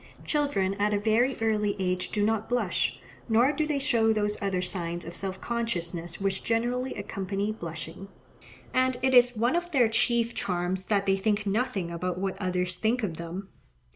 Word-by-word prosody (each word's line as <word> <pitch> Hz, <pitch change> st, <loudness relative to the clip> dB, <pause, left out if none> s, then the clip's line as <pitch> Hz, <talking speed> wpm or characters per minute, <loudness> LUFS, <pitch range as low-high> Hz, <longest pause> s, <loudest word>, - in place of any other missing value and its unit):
Children 285 Hz, -11 st, +1 dB
at 210 Hz, 0 st, +2 dB
a -, -, +1 dB
very 230 Hz, +5 st, +2 dB
early 210 Hz, -2 st, +1 dB
age 185 Hz, -1 st, -1 dB
do 205 Hz, -1 st, +1 dB
not 220 Hz, 0 st, 0 dB
blush; 245 Hz, 0 st, 0 dB, 0.3 s
nor 235 Hz, +5 st, +5 dB
do 305 Hz, 0 st, -1 dB
they 300 Hz, -2 st, 0 dB
show 235 Hz, -6 st, +3 dB
those 210 Hz, -1 st, +1 dB
other 195 Hz, -2 st, 0 dB
signs 175 Hz, -2 st, -3 dB
of 170 Hz, -, -7 dB
self 190 Hz, +1 st, -3 dB
consciousness 175 Hz, -8 st, -2 dB
which 195 Hz, -1 st, -1 dB
generally 245 Hz, +3 st, 0 dB
accompany 200 Hz, 0 st, -2 dB
blushing; 165 Hz, -1 st, -7 dB, 0.7 s
and 255 Hz, 0 st, +2 dB
it 260 Hz, 0 st, +3 dB
is 245 Hz, -1 st, +6 dB
one 240 Hz, +7 st, +2 dB
of 350 Hz, 0 st, -1 dB
their 250 Hz, -8 st, +4 dB
chief 235 Hz, +1 st, +2 dB
charms 180 Hz, +1 st, -1 dB
that 200 Hz, -1 st, +1 dB
they 195 Hz, 0 st, +3 dB
think 205 Hz, +1 st, 0 dB
nothing 200 Hz, -4 st, -1 dB
about 180 Hz, +1 st, -2 dB
what 190 Hz, 0 st, -2 dB
others 180 Hz, -1 st, -1 dB
think 230 Hz, +5 st, +1 dB
of 170 Hz, -6 st, -2 dB
them. 175 Hz, +4 st, -6 dB
205 Hz, 175 wpm, -28 LUFS, 185-235 Hz, 0.7 s, is